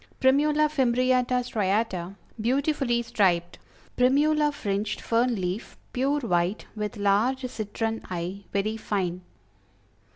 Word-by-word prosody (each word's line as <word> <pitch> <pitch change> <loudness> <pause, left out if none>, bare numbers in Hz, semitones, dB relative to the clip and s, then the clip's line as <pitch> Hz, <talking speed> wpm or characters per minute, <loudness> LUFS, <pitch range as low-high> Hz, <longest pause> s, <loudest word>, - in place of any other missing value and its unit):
Primula 295 +3 +4
Fimbriata 255 -2 +2
Striata; 195 -4 -1 0.3
beautifully 260 0 +1
striped. 190 -7 +1 0.4
Primula 295 +4 +3
Fringed, 205 -5 -2
Fern 235 +1 +1
Leaf; 185 +2 -4 0.2
pure 275 +3 +1
white, 180 -3 0
with 210 0 -4
large 215 +7 +2
citron 225 0 -3
eye; 180 +3 -4
very 210 +2 -1
fine. 185 -5 -2
225 Hz, 100 wpm, -26 LUFS, 200-260 Hz, 0.4 s, Primula